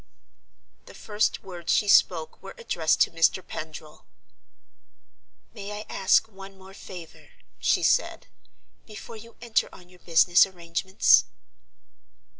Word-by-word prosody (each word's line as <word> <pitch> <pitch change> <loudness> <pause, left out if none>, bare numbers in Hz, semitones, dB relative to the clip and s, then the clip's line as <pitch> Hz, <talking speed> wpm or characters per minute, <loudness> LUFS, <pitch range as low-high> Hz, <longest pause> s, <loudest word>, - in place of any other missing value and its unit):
The - - -14
first 210 0 -2
words 175 -3 -6
she 210 - +1
spoke 165 -5 +2
were 195 - -11
addressed 165 -9 -1
to - - +3
Mr. 165 +2 +1
Pendril. 155 -1 -9 1.5
"May 205 -2 -8
I 215 - -9
ask 195 +3 +2
one 195 -2 -13
more 190 0 -15
favor," 180 -4 -12 0.3
she - - +1
said, - - 0 0.6
"before 220 +1 -11
you 230 +2 -15
enter 235 -2 0
on 180 -1 -16
your 180 0 -20
business 175 +2 +4
arrangements?" 180 +1 +2
190 Hz, 120 wpm, -25 LUFS, 170-200 Hz, 1.5 s, business